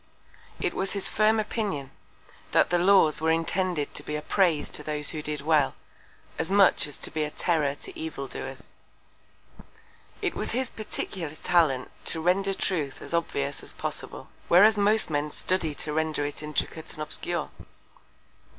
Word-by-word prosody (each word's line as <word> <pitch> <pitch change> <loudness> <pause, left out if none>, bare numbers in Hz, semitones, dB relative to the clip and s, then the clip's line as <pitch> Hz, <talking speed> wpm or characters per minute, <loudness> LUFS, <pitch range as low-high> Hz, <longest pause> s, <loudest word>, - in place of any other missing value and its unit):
It - - -1
was 190 0 -2
his 200 -2 +2
firm 215 +1 +3
Opinion, 205 - -2 0.6
that - - +4
the 175 - +3
Laws 175 -5 +5
were 160 - +2
intended 165 -1 0
to - - -1
be 150 - -4
a 150 - -2
Praise 175 -6 +2
to - - -5
those 150 -1 0
who 155 - -4
did 150 -1 -4
well, 150 -2 +2 0.6
as 165 - -1
much 195 -5 +5
as 145 - -4
to - - -3
be 155 -1 -1
a 150 - -2
Terror 150 -3 0
to 380 - -11
Evildoers. 325 -1 -6 1.6
It - - -1
was - - -3
his 255 +1 -1
peculiar 180 -7 -5
Talent 155 -8 +2
to 165 - 0
render 190 +4 +2
Truth 150 -10 -1
as - - -8
obvious 145 -4 -1
as - - -10
possible: - - -5 0.2
Whereas 205 +6 +7
most 210 -2 +3
Men 145 0 0
study 160 -1 -1
to 150 - -4
render 155 -1 0
it 145 0 -4
intricate 150 +1 -3
and 155 - -4
obscure. - - -3
160 Hz, 160 wpm, -27 LUFS, 150-195 Hz, 1.6 s, Whereas